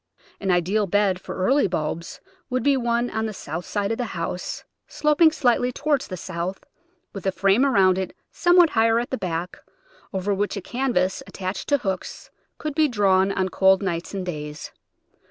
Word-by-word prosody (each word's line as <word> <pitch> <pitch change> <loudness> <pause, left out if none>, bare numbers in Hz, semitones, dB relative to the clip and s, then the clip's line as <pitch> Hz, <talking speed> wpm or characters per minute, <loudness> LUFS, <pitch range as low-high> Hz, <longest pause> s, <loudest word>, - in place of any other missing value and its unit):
An 195 - -3
ideal 185 +4 +2
bed 195 -1 +1
for - - -7
early 255 +9 +2
bulbs 165 -1 -4 0.3
would 255 -2 -1
be 280 +1 +4
one 240 -1 0
on 220 0 -1
the 215 - -6
south 160 +2 -6
side 205 0 -1
of 225 - -2
the - - +1
house, 170 +2 -4 0.2
sloping 300 +2 +3
slightly 245 -4 +2
toward 290 +1 0
the 185 -9 -6
south, 180 +2 -5 0.5
with 195 -1 -5
a - - +3
frame 195 +6 +3
around 190 -9 +4
it 190 - -4 0.2
somewhat 350 -2 +5
higher 225 -1 +3
at 240 +1 -2
the 260 - -1
back, 175 0 -4 0.5
over 190 +1 -1
which 200 +1 -1
a - - -4
canvas 235 -8 0
attached 185 0 -5
to 285 - +4
hooks 190 -7 -5 0.3
could 305 -1 -4
be 310 +1 +3
drawn 195 -5 +3
on 190 -1 0
cold 190 +1 +4
nights 170 -3 -3
and 195 -2 -4
days. 150 -3 -6
195 Hz, 180 wpm, -23 LUFS, 185-245 Hz, 0.5 s, somewhat